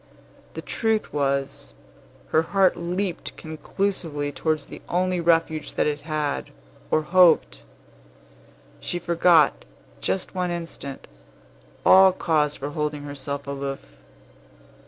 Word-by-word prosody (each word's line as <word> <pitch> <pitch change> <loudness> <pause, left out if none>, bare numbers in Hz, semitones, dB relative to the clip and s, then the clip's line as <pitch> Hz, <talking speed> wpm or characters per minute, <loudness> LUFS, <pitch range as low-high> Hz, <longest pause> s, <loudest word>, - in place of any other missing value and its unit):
The - - -6
truth 220 -2 -1
was, 140 -1 -1 0.5
her 160 - +4
heart 190 +3 +2
leaped 175 +1 -3
conclusively 160 -2 -3
towards 155 0 -1
the - - -11
only 180 0 +1
refuge 165 -2 +1
that - - +1
it 150 0 -1
had, 150 -2 -2 0.4
or 155 - +2
hoped. 175 - +4 1.2
She 175 - -3
forgot, 170 0 +3 0.4
just 190 - -2
one 180 -1 -1
instant, 165 -5 -6 0.8
all 190 0 +8
cause 150 -4 +1
for 145 +2 -5
holding 150 -1 -3
herself 140 0 -5
aloof. 140 -1 -5
160 Hz, 110 wpm, -24 LUFS, 145-180 Hz, 1.2 s, all